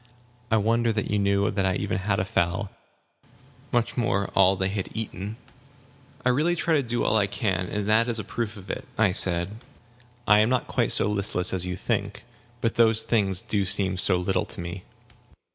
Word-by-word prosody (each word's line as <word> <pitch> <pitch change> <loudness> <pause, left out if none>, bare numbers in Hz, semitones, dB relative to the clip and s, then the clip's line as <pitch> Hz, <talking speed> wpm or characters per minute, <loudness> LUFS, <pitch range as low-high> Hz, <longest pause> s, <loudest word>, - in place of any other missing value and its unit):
I 110 - +3
wonder 115 +2 +1
that 110 -2 -3
you 105 - +1
knew 100 0 +1
that 100 -1 -1
I 95 -1 +1
even 100 -1 -2
had 100 +1 -1
a 95 - -1
fowl; 95 +1 -1 1.0
much 120 0 0
more 100 -5 0
how 95 -1 +5
much 95 - -7
they 95 - +1
had 100 -1 -4
eaten!" 105 -1 -5 0.9
"I - - +4
really 155 +7 +2
do - - -8
try 165 - +1
to 150 - +3
do 120 -2 -1
all 110 - +2
I 100 -2 +2
can, 95 -4 -2
and 105 +1 -3
that 110 +2 +3
is 120 -1 -1
a 105 - -4
proof 110 +1 -4
of 95 -1 -7
it," - - -7
I 105 -4 +3
said. 90 +2 +1 0.7
"I 105 0 +6
am 110 +2 +3
not 125 -1 0
quite - - 0
so - - +5
listless 100 -3 -1
as 90 -1 +2
you 90 - -3
think. - - -3 0.4
But 115 - 0
those 115 -1 +4
things 100 -5 0
do 100 -2 0
seem 95 -1 +2
so 95 0 +4
little 90 +2 -1
to - - -6
me." 85 +2 -7
100 Hz, 210 wpm, -25 LUFS, 95-110 Hz, 1.0 s, I